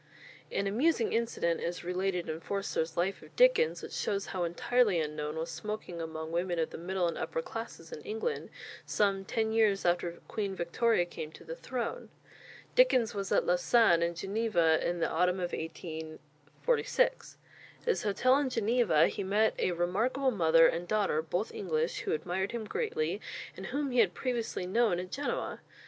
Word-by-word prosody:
An 200 - 0
amusing 235 +4 +2
incident 225 -7 0
is 175 +1 -3
related 180 0 -1
in 160 0 -3
Forster's 170 -3 -2
"Life 185 +3 0
of - - -16
Dickens," - - +4
which - - -7
shows 200 -1 -1
how 185 -2 -3
entirely 200 +3 +2
unknown 150 0 -3
was 160 +1 -3
smoking 210 -5 -5
among 160 0 -5
women 175 +1 -1
of 160 -1 0
the - - -7
middle 180 +1 0
and 170 - -3
upper 485 - -2
classes - - -7
in 475 - -7
England 450 +2 -3 0.3
some 195 -2 +1
ten 220 +3 -1
years 215 -4 +3
after 175 0 +1
Queen 200 -3 -3
Victoria 175 +3 +1
came 155 -3 -7
to - - -13
the 165 0 -6
throne. 255 - -4 0.6
Dickens 260 - +4
was 200 -1 -4
at - - +3
Lausanne 175 0 +4
and 170 0 0
Geneva 190 -5 +2
in 175 0 -1
the - - +3
autumn 180 +2 +1
of 175 -1 -3
1846. 160 - -2 0.4
At - - -23
his 465 - +2
hotel 255 +6 +3
in 285 -2 0
Geneva 225 -8 +3
he - - -4
met 210 +3 +2
a - - +2
remarkable 220 +11 +1
mother 165 -5 +5
and 170 +2 +1
daughter, 205 -7 +1
both 175 +6 -2
English, 160 -4 -1
who - - -3
admired 180 +6 -2
him 230 -2 -3
greatly, 460 - -2 0.3
and - - -7
whom 280 +1 -2
he 250 - +2
had - - +4
previously 235 -7 -2
known 210 0 +2
at 180 0 -6
Genoa. 285 +2 -3
190 Hz, 170 wpm, -31 LUFS, 170-235 Hz, 0.6 s, mother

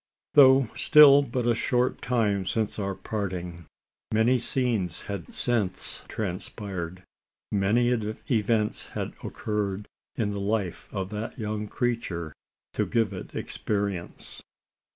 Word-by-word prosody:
Though 135 -3 +7
still 145 -2 +8
but 125 -3 -2
a 120 - +4
short 125 +2 0
time 105 -6 +1
since 110 0 -1
our 100 -1 -2
parting, 90 -4 -4 0.4
many 115 +4 +3
scenes 115 -9 -1
had 100 -5 -6
since 110 -7 0
transpired 95 -2 -5 0.5
many 105 +4 +3
events 110 -1 0
had - - -4
occurred 105 -1 -3 0.3
in 105 -3 0
the 100 -1 -3
life 100 -3 -2
of 95 0 -4
that 105 +4 -5
young 105 -2 -3
creature 100 - -2 0.4
to - - 0
give 115 -4 +1
it 90 - -8
experience. 100 -4 -4
105 Hz, 115 wpm, -27 LUFS, 95-120 Hz, 0.5 s, still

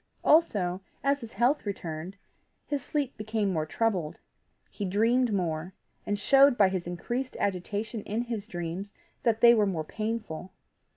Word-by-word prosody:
Also, 195 - +3 0.2
as 280 0 +2
his 230 -1 -9
health 255 +6 +2
returned, 175 -3 -5 0.5
his 285 -2 -2
sleep 285 -4 -2
became 215 -2 -1
more 155 -2 -1
troubled; 185 -5 -1 0.5
he 205 - -5
dreamed 225 +6 +2
more, 175 -2 -2 0.3
and 205 - 0
showed 275 +4 +5
by 195 -2 +6
his 185 -2 -3
increased 240 +9 -3
agitation 205 +4 -2
in 215 +4 -2
his 225 -3 -5
dreams 175 +1 -4 0.3
that 225 -2 +1
they 235 0 +9
were 215 -3 +3
more 170 -5 -1
painful. 215 -4 -4
210 Hz, 150 wpm, -28 LUFS, 180-235 Hz, 0.5 s, they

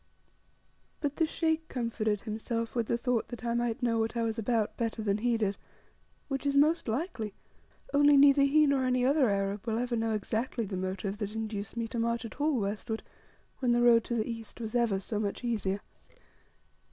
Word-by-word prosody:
But 290 -2 -2
the 325 - +3
Sheikh 320 0 0
comforted 220 -4 -1
himself 230 +1 -3
with 235 -3 -1
the 235 - +1
thought 240 -1 0
that 240 0 -8
I 235 - 0
might 240 +1 -1
know 230 -2 +2
what 225 +1 -1
I 230 - +1
was 225 0 -1
about 225 -1 0
better 230 -1 -2
than 205 0 +1
he 235 +1 +1
did, 205 -3 -1 0.7
which 270 -2 -3
is 280 -1 +1
most 310 +2 +3
likely, 225 - -3 0.6
only 290 0 +6
neither 280 0 +7
he 295 +2 +5
nor 280 -2 +2
any 250 0 +2
other 275 -2 +4
Arab 200 +2 -1
will 225 -1 0
ever 245 0 -1
know 225 -1 0
exactly 225 +3 -2
the 190 - -5
motive 190 +2 -3
that 210 0 -4
induced 220 -1 -4
me 230 -1 -1
to 235 - -3
march 235 0 0
at 230 - -8
all 295 -4 +2
westward 215 +2 -3 0.6
when 245 -3 +2
the 240 - +3
road 235 -1 +6
to 240 - -2
the 220 -1 0
east 230 -1 -7
was 220 -2 -5
ever 235 -5 +2
so 205 +2 -3
much 205 +3 -3
easier. 205 -4 -1
230 Hz, 200 wpm, -30 LUFS, 215-255 Hz, 0.7 s, neither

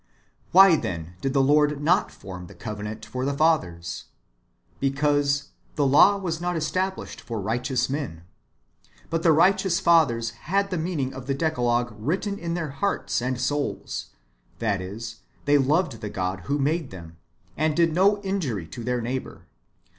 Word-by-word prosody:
Why, 190 -2 +8
then, 85 - -5
did 135 -1 -1
the 135 -2 +4
Lord 150 +1 +3
not 165 +5 +2
form 90 -1 -9
the - - -14
covenant 105 0 -6
for 125 +4 -4
the 140 +1 -1
fathers 90 - 0 0.4
% - - -39
Because 145 +1 +1
" - - -36
the 145 - +2
law 160 +9 +6
was 170 -4 -3
not 175 0 -1
established 185 +4 -2
for 115 -2 -5
rio 110 +5 -1
hteous 130 0 0
men."* 130 - -4 0.9
But 165 0 0
the 165 - +5
righteous 185 +2 +3
fathers 140 - +3
had 195 - -1
the 180 - -1
meaning 155 -6 -2
of 130 -1 -9
the 135 - 0
Decalogue 120 -6 0
written 185 - -2
in 170 0 -3
their 165 -4 -3
hearts 140 -2 -1
and 125 0 -2
souls, 145 +3 -2 0.5
that 105 -5 0
is, 100 +5 -7 0.3
they 145 0 +4
loved 140 - +1
the 105 - -4
God 95 -1 -2
who 140 +1 0
made 150 +2 0
them, 85 -3 -11 0.4
and 155 0 +1
did 165 -2 +3
no 200 +4 +4
injury 155 - -2
to 120 - -7
their 125 0 -1
neigh 125 +3 -1
bour. - - -13
140 Hz, 170 wpm, -25 LUFS, 115-165 Hz, 0.9 s, Why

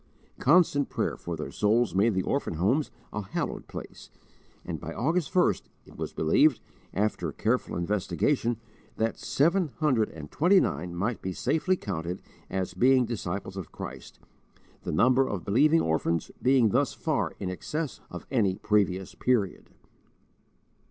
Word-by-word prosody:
Constant 145 -2 +4
prayer - - -1
for 85 - -5
their 75 - -5
souls 110 +3 +2
made 100 +3 +3
the 95 - +1
orphan 140 - -1
homes 110 - +1 0.2
a 105 - -2
hallowed 95 - -4
place, - - -9 0.6
and - - -4
by - - -6
August 160 +5 0
1st, 180 -1 +3 0.2
it - - -16
was - - -4
believed, 130 - +3 0.3
after 105 +2 -1
careful 120 +4 -1
investigation, 105 +7 0 0.4
that 115 0 -1
seven 170 +5 +2
hundred 130 -9 +2
and 75 -2 -10
twenty 185 +5 +5
nine 85 - -2
might 105 +7 -2
be 95 - -3
safely 160 - +1
counted 90 - -4 0.3
as 95 -1 -2
being 125 +6 +4
disciples 95 -4 -4
of 95 -5 -6
Christ, - - -8 0.6
the - - -4
number 130 - +4
of 100 -4 -4
believing 150 +10 +4
orphans 80 +1 0
being 125 -3 +4
thus - - +1
far - - -1
in 90 - -3
excess 150 - -4
of 90 - -8
any 105 -8 +2
previous 95 -3 0
period. 115 -7 0
110 Hz, 145 wpm, -28 LUFS, 95-135 Hz, 0.6 s, twenty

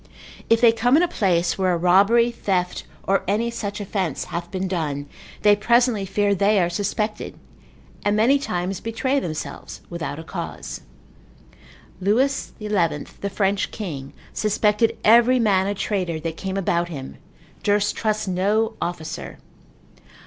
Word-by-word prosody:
If 230 0 +4
they 235 -2 +7
come 245 +4 +3
in 340 - +4
a - - +3
place 185 - +1
where 185 -1 +2
a - - +1
robbery, 200 +7 +4
theft, 185 -5 -2 0.2
or 195 0 +1
any 220 +4 0
such 205 -3 -4
offence 190 -7 -2
hath 170 0 -5
been 190 +1 -3
done, 150 -6 -2 0.4
they 205 -1 +6
presently 235 -1 +2
fear 200 +1 +1
they 200 +1 +3
are 175 -1 +1
suspected, 210 +2 -2 0.7
and 205 0 +2
many 245 +7 +4
times 180 -6 -3
betray 260 +5 0
themselves 160 - -6
without 170 -4 -4
a 160 - -7
cause. - - -6 1.2
Lewis 245 +9 +1
XI., 215 - -6
the 180 0 -1
French 195 0 0
king, 145 -10 -6 0.2
suspected 210 +1 +1
every 235 +3 +6
man 195 -4 +3
a 205 - -1
traitor 185 -5 -2
that 165 0 -3
came 190 +2 -4
about 175 -2 0
him, 135 -5 -7 0.4
durst 205 0 +1
trust 215 -2 -1
no 205 +5 +1
officer. 170 -2 -5
200 Hz, 145 wpm, -23 LUFS, 180-220 Hz, 1.2 s, they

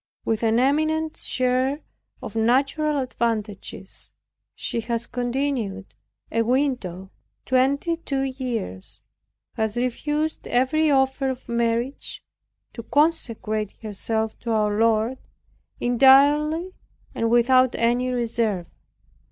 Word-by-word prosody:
With 225 -1 0
an 225 0 +3
eminent 310 +4 +1
share 255 +3 0 0.4
of - - -7
natural 275 +6 +2
advantages, 230 -5 -3 0.4
she - - -3
has 230 0 -2
continued 245 -6 -2 0.4
a 230 - +2
widow 230 -7 -1 0.3
twenty 280 +6 +2
two 275 -5 -2
years; 245 - -4 0.5
has 220 0 -2
refused 295 +6 -1
every 280 +6 +2
offer 265 -1 +2
of 260 -1 -6
marriage 235 +3 -2 0.5
to 230 - -6
consecrate 230 -8 0
herself 220 +1 -3
to 235 - -6
our 210 -2 +1
Lord 225 +2 +2 0.6
entirely 290 +7 +4 0.4
and 230 - 0
without 255 +2 +4
any 240 +2 +1
reserve. 230 -6 -1
250 Hz, 100 wpm, -24 LUFS, 225-275 Hz, 0.6 s, entirely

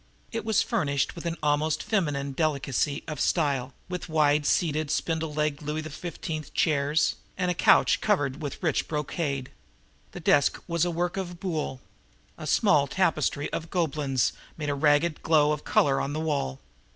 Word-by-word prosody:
It 225 -1 -3
was 220 0 +2
furnished 140 - 0
with 170 0 -6
an 170 0 -2
almost 150 +1 +1
feminine 145 -10 0
delicacy 140 -1 0
of 155 -3 -5
style, 140 -6 +1 0.2
with 180 -1 -5
wide 150 -2 +3
seated, 155 -3 +1
spindle 160 0 -1
legged 150 -1 -1
Louis 150 +1 -3
XV. 155 -1 -6
chairs 150 0 +2 0.2
and 180 -1 +1
a - - +1
couch - - +4
covered 145 -11 +1
with 145 +4 -6
rich 160 -5 +1
brocade. 145 -3 -2 0.6
The - - -6
desk 140 - +3
was 170 0 +1
a - - 0
work 175 +2 -1
of 175 -2 -4
Boulle. 155 -8 -3 0.5
A 155 - -7
small 150 -5 +4
tapestry 155 -4 0
of - - -1
the 160 - -13
Gobelins 145 -7 0 0.2
made 150 -2 -2
a - - 0
ragged 150 +3 +2
glow 150 -2 +4
of 150 -1 -2
color 135 -2 +3
on 140 - -3
the 155 - -2
wall. 145 - -1
155 Hz, 165 wpm, -27 LUFS, 145-170 Hz, 0.6 s, couch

